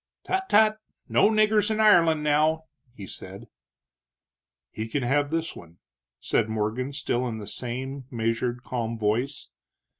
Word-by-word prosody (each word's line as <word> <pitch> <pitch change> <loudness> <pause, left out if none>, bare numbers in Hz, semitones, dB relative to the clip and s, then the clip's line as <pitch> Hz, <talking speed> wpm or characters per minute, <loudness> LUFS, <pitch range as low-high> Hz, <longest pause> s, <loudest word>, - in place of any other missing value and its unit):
"Tut, 380 0 -2
tut! 215 +1 +4 0.3
No - - +4
niggers 215 -1 +3
in 220 0 -1
Ireland, 165 -8 +5
now!" 155 +2 +2 0.3
he 100 - -8
said. - - -8 1.2
"He 110 +1 -5
can 135 +4 -2
have 145 +3 +1
this 165 +1 -2
one," 85 0 -13 0.4
said 110 - 0
Morgan, 110 +5 -2
still 130 -3 -1
in 115 -2 -4
the 105 - -7
same 130 +4 -5
measured, 120 +1 -2
calm 115 -3 -3
voice. 115 +6 -1
135 Hz, 140 wpm, -26 LUFS, 115-165 Hz, 1.2 s, Ireland